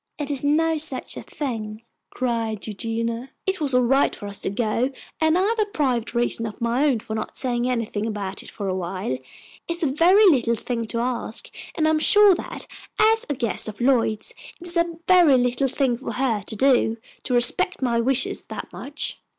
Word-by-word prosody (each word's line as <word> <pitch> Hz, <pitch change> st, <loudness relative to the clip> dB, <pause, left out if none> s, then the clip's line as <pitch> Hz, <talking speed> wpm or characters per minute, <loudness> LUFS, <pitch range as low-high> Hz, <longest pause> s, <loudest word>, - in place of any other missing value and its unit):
"It 295 Hz, -1 st, -3 dB
is 280 Hz, -2 st, 0 dB
no 320 Hz, +3 st, +2 dB
such 295 Hz, -4 st, +1 dB
a -, -, -6 dB
thing!" 220 Hz, -6 st, -5 dB, 0.3 s
cried 230 Hz, -4 st, -2 dB
Eugenia. 230 Hz, +3 st, -3 dB, 0.2 s
"It 380 Hz, -3 st, -1 dB
was 275 Hz, -4 st, +2 dB
all 250 Hz, -, +4 dB
right 270 Hz, +3 st, +2 dB
for -, -, -9 dB
us 200 Hz, 0 st, -4 dB
to -, -, -2 dB
go, 230 Hz, +4 st, 0 dB, 0.3 s
and 315 Hz, +1 st, +3 dB
I've 430 Hz, +5 st, +1 dB
a 425 Hz, -, +2 dB
private 255 Hz, -, -1 dB
reason 235 Hz, -1 st, 0 dB
of 215 Hz, -, -9 dB
my 235 Hz, +4 st, +1 dB
own 275 Hz, -5 st, +3 dB
for 220 Hz, -, -6 dB
not 220 Hz, -, -5 dB
saying 245 Hz, -1 st, -1 dB
anything 225 Hz, -3 st, -2 dB
about 200 Hz, -3 st, -4 dB
it -, -, -12 dB
for 200 Hz, -, -5 dB
awhile. 185 Hz, -3 st, -3 dB
It 130 Hz, 0 st, -3 dB, 0.5 s
is 340 Hz, -, -6 dB
a 285 Hz, -, +1 dB
very 360 Hz, +9 st, +5 dB
little 245 Hz, -, +4 dB
thing 230 Hz, +1 st, -3 dB
to 230 Hz, +1 st, -4 dB
ask, 240 Hz, -2 st, -4 dB, 0.2 s
and 315 Hz, -3 st, +2 dB
I'm 315 Hz, 0 st, +3 dB
sure 415 Hz, +3 st, +6 dB
that, 350 Hz, -, -6 dB, 0.3 s
as 445 Hz, +1 st, +3 dB
a 290 Hz, -, 0 dB
guest 235 Hz, -4 st, -1 dB
of 215 Hz, -, -7 dB
Lloyd's, 235 Hz, -4 st, +1 dB, 0.3 s
it 350 Hz, -, -11 dB
is 350 Hz, 0 st, -3 dB
a 340 Hz, -1 st, 0 dB
very 350 Hz, -7 st, +6 dB
little 250 Hz, +2 st, +1 dB
thing 255 Hz, -2 st, 0 dB
for 270 Hz, -, -5 dB
her 245 Hz, -5 st, 0 dB
to -, -, -3 dB
do, 240 Hz, -2 st, +3 dB, 0.2 s
to 250 Hz, -, -1 dB
respect 265 Hz, +7 st, +3 dB
my 235 Hz, -2 st, +1 dB
wishes 260 Hz, +3 st, 0 dB
that -, -, -8 dB
much." 290 Hz, +2 st, -5 dB
250 Hz, 200 wpm, -23 LUFS, 230-300 Hz, 0.5 s, sure